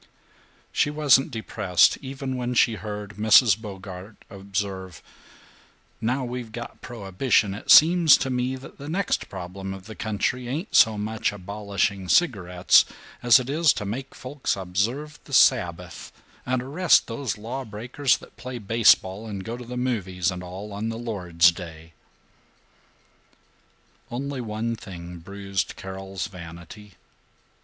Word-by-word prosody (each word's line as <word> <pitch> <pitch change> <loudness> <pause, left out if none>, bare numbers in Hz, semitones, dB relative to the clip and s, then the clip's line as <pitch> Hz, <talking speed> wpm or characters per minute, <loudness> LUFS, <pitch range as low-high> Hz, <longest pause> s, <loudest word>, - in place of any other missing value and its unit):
She - - +1
wasn't 145 -2 +4
depressed 105 - +2
even 135 -1 -5
when 125 0 -3
she 115 -1 +4
heard 105 -1 -7
Mrs. 110 0 +6
Bogart 100 -1 -9 0.2
observe, 95 -3 -5 1.0
"Now 125 +4 0
we've 120 -2 -6
got 120 +1 -8
prohibition 100 -1 0
it 105 - -9
seems 165 -1 +8
to 135 - -2
me 125 +1 -1
that 130 +1 -12
the 145 +1 -7
next 190 +3 -1
problem 95 +1 -6
of 95 -1 -12
the 110 - -9
country 110 +4 -2
ain't 155 - -4
so 110 -2 +6
much 110 +1 -1
abolishing 100 -1 -3
cigarettes 90 - +4 0.4
as 120 0 +7
it 125 - -5
is 155 +3 +3
to 105 - -5
make 130 +7 -5
folks 130 +2 -3
observe 110 - -2
the 140 - -12
Sabbath 90 -10 +2 0.4
and 125 -1 0
arrest 160 +8 +3
these 120 0 -4
law 120 +6 -5
breakers 120 +5 0
that - - -17
play 125 0 -6
baseball 110 -2 +3
and 100 -3 -6
go 115 +1 -4
to 125 0 -9
the 125 +1 -6
movies 95 -9 -1
and 90 -1 -6
all 95 +4 -8
on 105 +3 -3
the 115 - -4
Lord's 90 -7 +2
Day." 85 -2 -10 2.2
Only 135 +2 -4
one 115 +1 -3
thing 90 -4 -9
bruised 100 +2 -4
Carol's 95 0 -6
vanity. 90 +3 -11
110 Hz, 140 wpm, -25 LUFS, 95-125 Hz, 2.2 s, seems